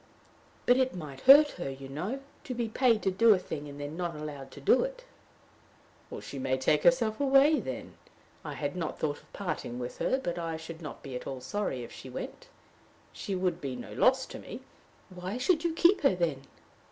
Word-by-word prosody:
"But 245 Hz, -, +5 dB
it 260 Hz, -3 st, +1 dB
might 150 Hz, -6 st, -7 dB
hurt 290 Hz, +2 st, +10 dB
her, 135 Hz, -, -2 dB
you 135 Hz, 0 st, -8 dB
know 185 Hz, -, -4 dB, 0.2 s
to 255 Hz, -4 st, -4 dB
be 235 Hz, -1 st, -1 dB
paid 230 Hz, -1 st, +2 dB
to 190 Hz, -, +2 dB
do 215 Hz, +3 st, +6 dB
a -, -, 0 dB
thing 150 Hz, -5 st, -6 dB
and 145 Hz, 0 st, -9 dB
then 145 Hz, +2 st, -5 dB
not 175 Hz, -2 st, -3 dB
allowed 145 Hz, -3 st, -7 dB
to -, -, -10 dB
do 140 Hz, -, +4 dB
it." -, -, -6 dB, 1.2 s
"She 140 Hz, -, -7 dB
may 130 Hz, 0 st, 0 dB
take 150 Hz, +3 st, +2 dB
herself 235 Hz, -4 st, +3 dB
away, 280 Hz, +2 st, +5 dB
then. 130 Hz, -, -6 dB, 0.5 s
I -, -, -5 dB
had 145 Hz, +2 st, -3 dB
not 170 Hz, -3 st, -3 dB
thought 145 Hz, -2 st, -2 dB
of -, -, -24 dB
parting 170 Hz, -10 st, -4 dB
with 125 Hz, 0 st, -6 dB
her, 260 Hz, -, +2 dB
but 175 Hz, -10 st, -3 dB
I 165 Hz, -1 st, -3 dB
should 160 Hz, +1 st, -9 dB
not 150 Hz, -, -8 dB
be 135 Hz, -3 st, -7 dB
at 125 Hz, -, -6 dB
all 135 Hz, -, -4 dB
sorry 160 Hz, -5 st, -3 dB
if 115 Hz, -, -9 dB
she -, -, -10 dB
went. -, -, -7 dB, 0.7 s
She 195 Hz, -, -4 dB
would 180 Hz, -2 st, -1 dB
be 135 Hz, -3 st, -3 dB
no 125 Hz, -, -8 dB
loss -, -, +3 dB
to -, -, -9 dB
me." -, -, -8 dB, 0.5 s
"Why 185 Hz, +4 st, -5 dB
should 320 Hz, +6 st, +2 dB
you 340 Hz, -, +1 dB
keep 350 Hz, +4 st, +5 dB
her, 275 Hz, -, +4 dB
then?" 155 Hz, -6 st, -1 dB
175 Hz, 210 wpm, -30 LUFS, -, 1.2 s, hurt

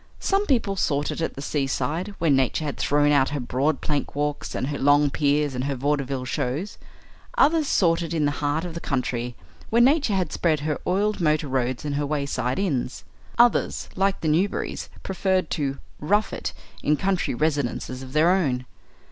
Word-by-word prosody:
Some 400 Hz, +1 st, +1 dB
people 230 Hz, -7 st, +1 dB
sought 145 Hz, -5 st, 0 dB
it -, -, -4 dB
at 165 Hz, -, -2 dB
the 140 Hz, -, -6 dB
seaside, 150 Hz, +7 st, -2 dB
where 165 Hz, -2 st, +2 dB
nature 135 Hz, +3 st, +2 dB
had 145 Hz, -, -3 dB
thrown 145 Hz, 0 st, +3 dB
out 140 Hz, -2 st, +4 dB
her 145 Hz, -, -3 dB
broad 135 Hz, +4 st, 0 dB
plank 145 Hz, -2 st, -2 dB
walks 145 Hz, 0 st, -2 dB
and -, -, -1 dB
her 145 Hz, -, -3 dB
long 145 Hz, +1 st, +4 dB
piers 145 Hz, -1 st, +1 dB
and 125 Hz, +1 st, -2 dB
her 140 Hz, -1 st, -1 dB
vaudeville 135 Hz, -1 st, -1 dB
shows. 145 Hz, +9 st, -3 dB, 0.6 s
Others 310 Hz, 0 st, +4 dB
sought 170 Hz, -7 st, +3 dB
it 170 Hz, -, -4 dB
in 160 Hz, -3 st, +1 dB
the 145 Hz, -, +2 dB
heart 150 Hz, +3 st, 0 dB
of 175 Hz, -, -6 dB
the 170 Hz, -, -5 dB
country, 125 Hz, -5 st, -2 dB, 0.3 s
where 230 Hz, -, +3 dB
nature 260 Hz, -3 st, +4 dB
had 180 Hz, -5 st, -1 dB
spread 155 Hz, -4 st, +1 dB
her 150 Hz, 0 st, -2 dB
oiled 205 Hz, +2 st, +1 dB
motor 155 Hz, -2 st, +2 dB
roads 130 Hz, +1 st, -1 dB
and 145 Hz, -1 st, -1 dB
her 145 Hz, -, 0 dB
wayside 140 Hz, -4 st, -1 dB
inns. 140 Hz, -10 st, -1 dB, 0.3 s
Others, 240 Hz, 0 st, +3 dB
like 195 Hz, +1 st, +1 dB
the 160 Hz, -, -1 dB
Newberrys, 175 Hz, +6 st, 0 dB
preferred 190 Hz, 0 st, 0 dB
to 140 Hz, -4 st, -1 dB, 0.2 s
"rough 205 Hz, +8 st, +1 dB
it" -, -, -3 dB, 0.3 s
in 150 Hz, 0 st, +2 dB
country 190 Hz, -7 st, 0 dB
residences 140 Hz, -3 st, -1 dB
of 130 Hz, 0 st, -9 dB
their 160 Hz, +3 st, +4 dB
own. 135 Hz, -10 st, +1 dB
150 Hz, 185 wpm, -24 LUFS, 135-180 Hz, 0.6 s, out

